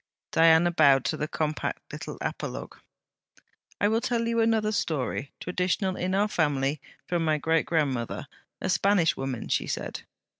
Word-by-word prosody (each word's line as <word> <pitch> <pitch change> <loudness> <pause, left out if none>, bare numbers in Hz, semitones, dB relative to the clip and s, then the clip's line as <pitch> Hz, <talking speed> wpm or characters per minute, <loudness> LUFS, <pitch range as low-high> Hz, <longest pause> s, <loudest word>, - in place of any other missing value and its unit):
Diana 165 +1 +5
bowed 140 -6 +5
to - - -1
the 150 - -2
compact 155 0 -3
little - - -6
apologue. - - -4 1.0
'I 205 - +3
will 225 +1 +1
tell 240 -2 0
you 230 0 +1
another 220 -1 +2
story, 145 -7 -2
traditional 185 +1 -1
in 185 +1 -1
our 205 +2 +3
family 145 -6 0 0.2
from 175 -2 -1
my 155 -1 +2
great 160 +1 +1
grandmother, 135 -8 -1 0.3
a - - -3
Spanish 180 -1 +3
woman,' 135 -3 -4
she - - 0
said. - - -4
165 Hz, 150 wpm, -27 LUFS, 150-200 Hz, 1.0 s, Diana